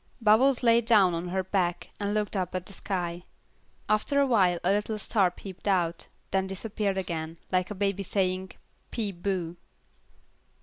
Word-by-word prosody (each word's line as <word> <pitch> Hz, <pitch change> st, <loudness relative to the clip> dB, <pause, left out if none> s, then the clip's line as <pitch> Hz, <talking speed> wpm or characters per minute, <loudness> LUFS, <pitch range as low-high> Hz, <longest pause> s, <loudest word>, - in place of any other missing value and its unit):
Bubbles 240 Hz, +4 st, +4 dB
lay 235 Hz, 0 st, +5 dB
down 210 Hz, -6 st, +4 dB
on 170 Hz, +1 st, -3 dB
her 190 Hz, +1 st, -1 dB
back, 180 Hz, -2 st, -1 dB
and 205 Hz, 0 st, -1 dB
looked 210 Hz, 0 st, -1 dB
up 185 Hz, -2 st, -2 dB
at 185 Hz, -1 st, -3 dB
the 200 Hz, -, -5 dB
sky. 175 Hz, -3 st, -3 dB, 0.7 s
After 215 Hz, +7 st, +2 dB
a 280 Hz, -, +5 dB
while 190 Hz, -9 st, +3 dB
a 180 Hz, -, +3 dB
little 210 Hz, +2 st, 0 dB
star 200 Hz, -2 st, +2 dB
peeped 185 Hz, +2 st, -10 dB
out, 175 Hz, -4 st, +1 dB, 0.2 s
then 190 Hz, 0 st, +1 dB
disappeared 200 Hz, 0 st, -2 dB
again, 165 Hz, -3 st, -3 dB
like 185 Hz, 0 st, +1 dB
a 210 Hz, -, -5 dB
baby 200 Hz, 0 st, 0 dB
playing 185 Hz, -1 st, -1 dB, 0.4 s
"Peep 200 Hz, -6 st, -4 dB
bo." 180 Hz, -3 st, -2 dB
195 Hz, 165 wpm, -28 LUFS, 180-210 Hz, 0.7 s, lay